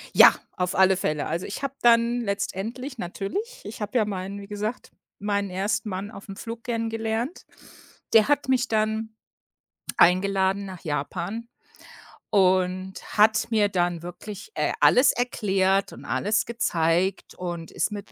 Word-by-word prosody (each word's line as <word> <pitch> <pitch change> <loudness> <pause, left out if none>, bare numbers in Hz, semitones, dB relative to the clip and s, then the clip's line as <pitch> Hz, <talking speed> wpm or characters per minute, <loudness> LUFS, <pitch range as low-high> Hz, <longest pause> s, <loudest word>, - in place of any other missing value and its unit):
Ja, - - +9 0.2
auf 180 0 -1
alle 190 0 +5
Fälle. 150 -5 -1
Also 170 +3 -3
ich 205 - -6
habe 275 -1 -2
dann 235 0 +4
letztendlich 225 +5 -4
natürlich 405 - -4
ich - - -8
habe 210 +4 -1
ja 220 - +3
meinen 195 0 -4
wie 200 - -10
gesagt, 210 +3 -4 0.3
meinen 200 -1 -1
ersten 210 +3 -1
Mann 195 +3 -4
aufm 195 -1 -9
Flug 230 +2 -7
kennengelernt. 225 +4 -2 0.7
Der 220 -1 +7
hat 290 -1 +1
mich 260 -2 +2
dann, 220 0 -1 0.8
eingeladen 190 +2 +3
nach 185 -3 -8
Japan 175 +9 -3 0.8
und 185 -1 +2 0.2
hat 215 +1 +5
mir 210 -2 +3
dann 175 -3 0
wirklich, 200 - -8
äh, - - 0
alles 255 +3 +6
erklärt 195 -5 +1
und - - -11
alles 215 +2 +1
gezeigt 180 -5 0
und 175 -2 -5
ist - - -1
mit 205 -1 -7
205 Hz, 140 wpm, -25 LUFS, 185-225 Hz, 0.8 s, Ja